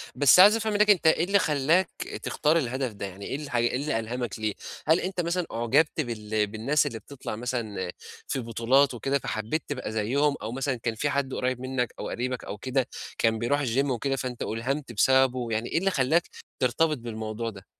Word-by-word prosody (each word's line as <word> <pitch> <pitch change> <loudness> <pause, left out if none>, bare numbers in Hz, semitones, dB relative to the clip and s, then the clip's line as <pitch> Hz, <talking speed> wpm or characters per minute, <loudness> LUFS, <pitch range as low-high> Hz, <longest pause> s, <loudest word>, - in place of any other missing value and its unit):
بس 140 +6 +6
عايز 205 +4 +9
أفهم 220 -1 -1
منك 210 +1 +3
أنت 180 -5 +5
إيه 160 - +4
اللي 200 +2 +3
خلّاك 155 +5 +2 0.3
تختار 155 +3 +2
الهدف 130 -3 -1
ده، 100 - -5
يعني 95 +1 -8
إيه - - -3
الحا 140 -5 -2
إيه 120 +1 +1
اللي 140 -3 -1
ألهمك 120 -1 -4
ليه؟ 110 -1 -1 0.3
هل 160 +3 +5
أنت 185 0 -2
مثلًا 170 +1 -1
أُعجبت 120 +8 +2
بال 110 -4 -2
بالناس 115 +8 +1
اللي 115 - -5
بتطَلع 125 -1 -7
مثلًا 110 -6 -3 0.4
في - - -2
بطولات 125 +4 +2
وكده 135 +4 -1
فحبّيت 110 +9 -3
تبقى 130 -6 -4
زيهم، 135 +7 +1
أو 110 +2 -4
مثلًا 135 +1 -1
كان 115 -1 -3
في 145 +6 -1
حد 140 -2 -1
قُريب 125 -1 -1
منك 130 -2 -2
أو - - -4
قريبك 125 +1 -3
أو 105 - -6
كده، 130 +2 -1 0.3
كان 115 -1 +2
بيرُوح 145 +6 +1
الGym 130 +4 +1
وكده 135 +2 -1
فأنت 125 -2 -5
أُلهمت 130 +4 -3
بسببه، 130 +1 +3
يعني 110 +2 -1
إيه - - 0
اللي 195 +3 +2
خلّاك 155 +4 +2 0.3
ترتبط 150 +4 +2
بالموضوع 110 -1 -4
ده؟ 100 -3 -12
130 Hz, 195 wpm, -27 LUFS, 115-145 Hz, 0.4 s, عايز